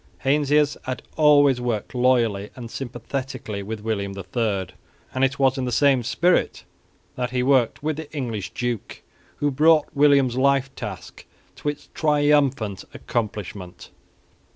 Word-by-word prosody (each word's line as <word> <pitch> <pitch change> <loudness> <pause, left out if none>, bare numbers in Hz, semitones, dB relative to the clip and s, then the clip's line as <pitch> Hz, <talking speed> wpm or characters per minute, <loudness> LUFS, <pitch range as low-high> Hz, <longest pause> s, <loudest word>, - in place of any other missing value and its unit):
Heinsius 145 +1 +2
had 130 0 -4
always 145 -4 +5
worked 120 -2 -3
loyally 120 -5 +2
and 120 -2 -9
sympathetically 125 -3 -5
with 105 +2 -6
William 100 -3 -3
III; 100 0 -2 0.4
and 130 - 0
it 135 +1 +1
was 135 0 +2
in 130 - -1
the 125 - -2
same 135 +1 +3
spirit 175 +9 +1 0.5
that 125 -1 -2
he 125 0 -1
worked 130 -1 +2
with 155 -1 -1
the 160 -2 -8
English 115 - -4
duke, 120 -1 -4 0.3
who 145 0 0
brought 155 +3 +4
William's 140 -4 +4
life 135 0 +2
task - - -8 0.3
to 150 - -2
its 145 - -7
triumphant 145 -9 +1
accomplishment. 105 -5 -5
130 Hz, 135 wpm, -23 LUFS, 110-145 Hz, 0.5 s, always